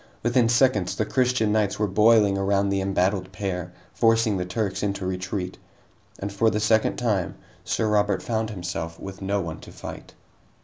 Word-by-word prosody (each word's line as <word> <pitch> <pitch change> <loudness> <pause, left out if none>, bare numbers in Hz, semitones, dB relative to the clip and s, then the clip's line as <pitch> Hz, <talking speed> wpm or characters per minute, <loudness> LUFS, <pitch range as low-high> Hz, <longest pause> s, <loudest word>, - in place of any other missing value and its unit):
Within 120 0 +3
seconds, 120 -6 +3
the 110 - 0
Christian 125 -2 +1
knights 105 -2 +1
were 105 - +1
boiling 105 0 +4
around 100 0 +1
the 100 0 0
embattled 95 0 0
pair, 90 -2 -4 0.2
forcing 115 -2 +3
the 90 - -2
Turks 95 +2 -2
into 100 -2 -2
retreat. 90 0 -3 0.6
And 100 +1 -5
for 110 +3 +3
the 105 - -1
second 110 +1 +2
time, 105 -7 -1 0.3
Sir 110 - 0
Robert 105 -2 +1
found 110 -1 -1
himself 85 -4 -5
with 95 0 -8
no 100 +1 0
one 80 -2 -5
to - - -12
fight. - - -9
100 Hz, 170 wpm, -25 LUFS, 95-110 Hz, 0.6 s, boiling